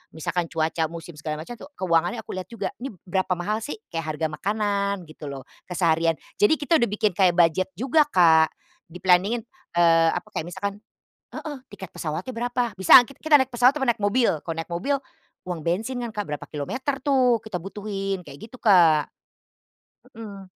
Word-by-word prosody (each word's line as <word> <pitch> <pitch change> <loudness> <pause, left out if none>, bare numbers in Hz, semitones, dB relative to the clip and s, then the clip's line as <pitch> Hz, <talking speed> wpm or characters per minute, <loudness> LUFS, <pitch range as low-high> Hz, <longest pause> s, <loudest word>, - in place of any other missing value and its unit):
misalkan 175 +2 -1
cuaca, 160 0 0
musim, 170 0 -8
segala 155 -1 -4
macamnya 240 +6 -10
tuh - - -11
keuangannya 175 +4 +1
aku - - -9
lihat 185 - -5
juga, 230 - -3
"Ini 265 - -4 0.2
berapa 190 0 -1
mahal 210 +5 -2
sih?" 295 - -5 0.2
Kayak 160 -2 -3
harga 160 +1 -1
makanan 200 +2 -1
gitu 155 -1 -10
loh, 135 -1 -7 0.2
keseharian. 165 -2 +1 0.2
Jadi 210 +9 +5
kita 315 +3 +2
udah 235 - +2
bikin 210 +1 0
kayak 185 -3 +4
budget 175 +2 +3
juga 270 - +3
Kak 160 -3 +6 0.4
di-planning-in, 185 +6 +2 0.3
eee, 165 -1 +5
apa, - - -4
kayak 160 - -2
misalkan 200 +2 -4 0.6
heeh, 295 -2 -6 0.2
tiket 190 -3 -9
pesawatnya 165 +10 -4
berapa, 245 0 -1
"Bisa 190 +5 +9
enggak 245 +3 -6
kit - - -26
kita 305 -2 +6
naik 265 - +1
pesawat 250 +3 +5
apa 290 -3 -2
naik 225 -3 +1
mobil." 230 +4 +3 0.2
Kalau 165 -1 -4
naik 165 - -4
mobil, 230 +12 -1 0.5
uang 175 -3 -3
bensin 225 +9 -1
kan 235 - -4
Kak 210 -2 -4
berapa 150 -1 -5
kilometer 255 - -3
tuh 255 -4 +3
kita 215 -5 -6
butuhin, 195 -1 -4
kayak 140 - -10
gitu 255 - -11
Kak. 170 -8 +5 1.1
Hmm. 205 -4 -9
195 Hz, 180 wpm, -24 LUFS, 165-235 Hz, 1.1 s, Bisa